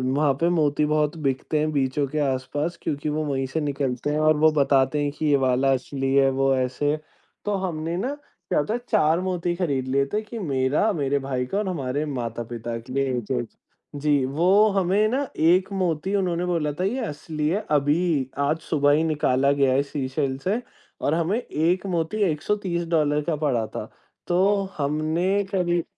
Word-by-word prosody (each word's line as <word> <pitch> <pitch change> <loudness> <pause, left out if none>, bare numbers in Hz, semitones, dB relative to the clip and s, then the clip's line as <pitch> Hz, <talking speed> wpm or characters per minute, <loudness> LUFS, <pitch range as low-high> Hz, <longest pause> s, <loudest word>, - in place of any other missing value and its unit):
वहाँ 145 -1 +3
पे 170 - +4
मोती 150 -3 +2
बहुत 150 +1 +1
बिकतें 135 +3 -1
हैं 155 +1 0
बीचों 140 0 0
के 150 +3 -3
आस-पास 145 +4 -1
क्योंकि 150 0 -2
वो 155 +1 -1
वहीं 135 -2 -1
से 160 +5 -2
निकलते 140 -2 -2
हैं 150 - 0
और 155 0 +4
वो 155 +1 +5
बताते 135 +1 +2
हैं 145 - -1
कि 155 - -4
ये 145 -2 +4
वाला 135 +1 +2
असली 135 +1 -2
है, 135 -1 +5
वो 135 0 +2
ऐसे। 130 +4 0 0.5
तो 205 - 0
हमने 165 0 -3
ना 260 +9 -2 0.3
क्या - - +2
होता 210 +9 -1
है, 245 - -1
4 165 -6 +3
मोती 180 -2 -1
खरीद 140 -8 -1
लिए 140 +1 +2
थे 215 - +1
कि 225 +2 -8
मेरा, 145 +4 +1
मेरे 140 -3 0
भाई 130 -2 -2
का 195 - -3
और 210 -2 -1
हमारे 145 -4 -2
माता-पिता 120 -3 -4
के 125 +3 -10
लिए 135 -2 0
1-1 100 - -2 0.5
जी, 145 -1 +2
वो 180 +10 +4
हमें 195 +2 +2
ना 275 +3 -1
एक 180 +5 +3
मोती 185 0 -1
उन्होंने 180 -2 0
बोला 165 -4 0
था, - - 0
ये 230 +8 0
असली 150 -2 -4
है, 200 +5 -1
अभी 145 -1 +2
आज 145 +3 +1
सुबह 145 -3 +2
ही 150 +2 +3
निकाला 140 -3 +2
गया 135 -2 +3
है 140 - +3
सीशेल 135 -1 -2
से 200 - -1 0.4
और 145 - +1
हमें 170 +7 +1
1 175 0 0
मोती 170 +2 -1
$130 165 -4 0
का 160 0 -1
पड़ा 120 -6 +1
था। - - -6 0.4
तो 175 - +1 0.4
हमने 160 +7 0
करीब 175 -2 +1
150 Hz, 185 wpm, -24 LUFS, 135-175 Hz, 0.5 s, वो